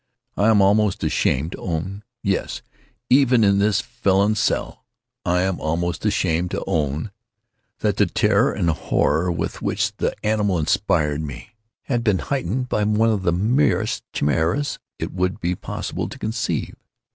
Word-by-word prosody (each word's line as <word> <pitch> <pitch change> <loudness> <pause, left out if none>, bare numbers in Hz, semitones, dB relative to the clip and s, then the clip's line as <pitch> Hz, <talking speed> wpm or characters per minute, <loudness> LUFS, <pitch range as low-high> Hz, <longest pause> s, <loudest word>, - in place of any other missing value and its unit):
I 105 - +2
am 105 -3 +5
almost 105 0 +2
ashamed 75 +6 +1
to - - -7
own—yes, 100 +5 -3 0.5
even 130 -3 +5
in 100 -1 +4
this 105 0 +2
felon's 105 -3 +1
cell, - - -1 0.4
I 90 +1 +2
am 95 -1 -1
almost 85 +2 -1
ashamed 85 +2 +1
to - - -3
own—that 105 - -4
the 105 - +4
terror 105 +7 +2
and 85 -5 +1
horror 85 +2 +1
with 85 -1 -3
which - - -1
the - - -1
animal 105 -3 +1
inspired 80 -3 +1
me, 75 - -8 0.3
had 120 -3 -1
been 105 -5 +3
heightened 125 +1 -2
by 105 - 0
one 110 +2 +3
of 105 -3 0
the 90 - +1
merest 110 - +1
chimaeras 80 - 0 0.2
it - - -5
would 90 +2 -1
be 85 +1 0
possible - - -4
to - - -9
conceive. 110 +2 -2
100 Hz, 145 wpm, -22 LUFS, 85-110 Hz, 0.5 s, am